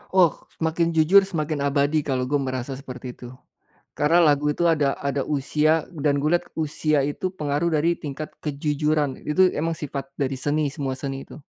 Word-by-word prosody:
Oh 175 Hz, -4 st, +6 dB, 0.2 s
semakin 165 Hz, +1 st, 0 dB
jujur 160 Hz, +5 st, +7 dB
semakin 155 Hz, -5 st, -2 dB
abadi 145 Hz, +2 st, +2 dB
kalau 130 Hz, -3 st, -1 dB
gua 145 Hz, +3 st, 0 dB
merasa 130 Hz, -1 st, -3 dB
seperti 125 Hz, -2 st, -8 dB
itu, 125 Hz, -, -11 dB, 0.7 s
karena 160 Hz, +4 st, +4 dB
lagu 150 Hz, -2 st, +3 dB
itu 170 Hz, +3 st, +1 dB
ada 150 Hz, -4 st, +2 dB
ada 140 Hz, -1 st, -1 dB
usia 150 Hz, +2 st, +1 dB
dan 145 Hz, -1 st, +1 dB
gua 155 Hz, +4 st, +3 dB
lihat 175 Hz, -, -7 dB
usia 155 Hz, -1 st, +1 dB
itu 145 Hz, +7 st, -2 dB
pengaruh 150 Hz, 0 st, -1 dB
dari 165 Hz, +3 st, +2 dB
tingkat 150 Hz, 0 st, -6 dB, 0.2 s
kejujuran 150 Hz, -1 st, 0 dB
itu 185 Hz, +5 st, +4 dB
emang 165 Hz, +2 st, 0 dB
sifat 140 Hz, -3 st, -6 dB
dari 135 Hz, -1 st, 0 dB
seni 145 Hz, +3 st, 0 dB
semua 140 Hz, -2 st, -3 dB
seni 135 Hz, 0 st, -5 dB
itu. -, -, -12 dB
150 Hz, 170 wpm, -24 LUFS, 140-160 Hz, 0.7 s, jujur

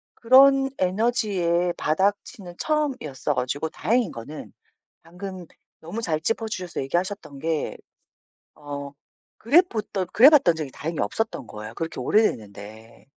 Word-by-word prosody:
그런 270 Hz, +2 st, +6 dB
에너지의 185 Hz, -4 st, +1 dB
바닥 195 Hz, +6 st, +1 dB
치는 180 Hz, -4 st, -11 dB
처음이었어 255 Hz, -, -1 dB
가지고 130 Hz, +5 st, -2 dB
다행인 235 Hz, +3 st, 0 dB
거는 130 Hz, +7 st, -9 dB, 0.5 s
방금 180 Hz, +1 st, -8 dB, 0.4 s
너무 185 Hz, +8 st, -6 dB
잘 165 Hz, -8 st, -1 dB
짚어 225 Hz, +4 st, -1 dB
주셔서 185 Hz, -8 st, -5 dB
얘기하셨던 175 Hz, 0 st, -3 dB
게 160 Hz, 0 st, -2 dB, 0.8 s
어 145 Hz, -1 st, -7 dB, 0.5 s
그래봇던 220 Hz, -, +2 dB
그래봤던 260 Hz, -, +7 dB
적이 155 Hz, -4 st, -5 dB
다행히 160 Hz, +4 st, -5 dB
없었던 135 Hz, -, -2 dB
거예요 110 Hz, +1 st, -8 dB
그렇게 165 Hz, 0 st, -5 dB
오래 215 Hz, -, +3 dB
됐는데. 110 Hz, -, -5 dB
175 Hz, 305 characters per minute, -24 LUFS, 145-225 Hz, 0.8 s, 그래봤던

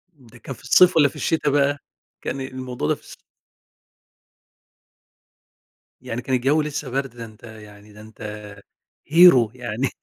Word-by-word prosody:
ده 125 Hz, -3 st, -19 dB
كان 135 Hz, -, -8 dB
في -, -, -20 dB
الصيف 180 Hz, -1 st, +5 dB
والَّا 145 Hz, -3 st, +5 dB
في -, -, -17 dB
الشتا 155 Hz, -2 st, 0 dB
بقى، 145 Hz, 0 st, +1 dB, 0.4 s
كان 135 Hz, -, -4 dB
الموضوع 130 Hz, -8 st, -5 dB
ده -, -, +1 dB
في -, -, -21 dB
الص -, -, -14 dB, 2.9 s
يعني 120 Hz, +2 st, -5 dB
كان 130 Hz, +1 st, -1 dB
الجوي 140 Hz, +5 st, +1 dB
لسه 150 Hz, -2 st, -5 dB
برد، 135 Hz, +1 st, -2 dB
ده 115 Hz, -, -8 dB
أنت 110 Hz, 0 st, -17 dB
يعني 105 Hz, -2 st, -14 dB
ده 105 Hz, -, -14 dB
أنت 110 Hz, +1 st, -16 dB, 0.9 s
hero 145 Hz, -9 st, +6 dB
يعني. 125 Hz, +1 st, -3 dB
130 Hz, 150 wpm, -22 LUFS, 115-145 Hz, 2.9 s, hero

